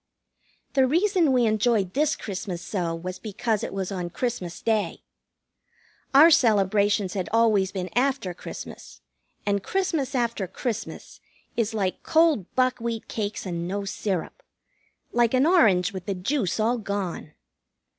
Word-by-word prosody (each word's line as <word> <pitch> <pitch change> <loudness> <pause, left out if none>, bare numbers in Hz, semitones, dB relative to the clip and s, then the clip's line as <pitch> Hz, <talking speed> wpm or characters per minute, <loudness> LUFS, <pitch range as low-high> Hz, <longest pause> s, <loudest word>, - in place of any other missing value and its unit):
The 265 -2 +4
reason 345 +1 +3
we 250 -2 +3
enjoyed 215 -3 +1
this 300 +2 +2
Christmas 190 -3 -5
so 175 -5 -2
was 185 +2 -6
because 215 0 -2
it - - -3
was 195 0 -3
on 180 -3 -3
Christmas 185 -5 -3
Day. 220 -2 0 1.1
Our 305 +5 +8
celebrations 205 - +3
had 185 -3 -3
always 215 -4 +3
been 185 -2 -5
after 260 -7 +1
Christmas, - - -9 0.4
and 200 -1 +1
Christmas 315 - -1
after 235 -5 -1
Christmas 225 +4 -5 0.4
is 225 -1 -1
like 190 -3 -1
cold 315 - +2
buckwheat 240 -3 0
cakes 210 -2 -4
and 170 -2 -3
no 200 +2 -3
syrup. 195 - -3 0.7
Like 240 +1 +2
an 255 +2 +4
orange 205 - +4
with 185 -2 -7
the 200 - -1
juice 205 - -1
all 230 +3 +1
gone. 200 -7 -4
215 Hz, 135 wpm, -25 LUFS, 190-255 Hz, 1.1 s, Our